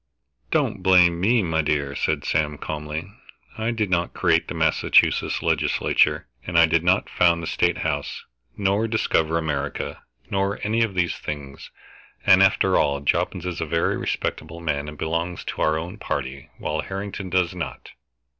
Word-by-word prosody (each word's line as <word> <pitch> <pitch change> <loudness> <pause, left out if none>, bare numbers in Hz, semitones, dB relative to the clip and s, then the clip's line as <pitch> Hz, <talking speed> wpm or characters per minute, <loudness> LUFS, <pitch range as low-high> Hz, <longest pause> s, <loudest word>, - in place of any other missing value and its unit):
"Don't - - 0
blame 90 -2 +5
me, 110 +3 +3
my 80 -2 +1
dear," 70 -2 -1
said - - -1
Sam 75 -2 0
calmly. 75 +6 -5 0.4
"I 110 +1 -2
did 110 -5 -1
not 85 -1 0
create - - +2
the - - -5
Massachusetts - - +2
Legislature, - - +2 0.2
and 90 -1 -2
I 85 - +8
did 80 +1 +1
not 90 +3 +2
found 85 -1 +2
the - - -3
State - - +1
House, - - -3 0.3
nor 100 +3 +1
discover 85 -7 +1
America, 75 -3 -3 0.3
nor 100 +1 0
any 110 +2 +1
of 110 -4 0
these 85 -1 0
things. 70 -2 -7 0.6
And 95 -1 +7
after 95 -1 +4
all, 70 -1 +1
Jobbins 90 +4 0
is 90 -2 -4
a - - -1
very 85 +2 +1
respectable 80 +2 -3
man 75 -3 -2
and 75 - -10
belongs 85 +3 -2
to - - -5
our 80 0 +2
own 90 +6 -6
party, 70 -4 -4
while 75 0 -2
Harrington 95 +2 -5
does 90 -1 +1
not. 80 -8 -6
85 Hz, 165 wpm, -23 LUFS, 75-95 Hz, 0.6 s, I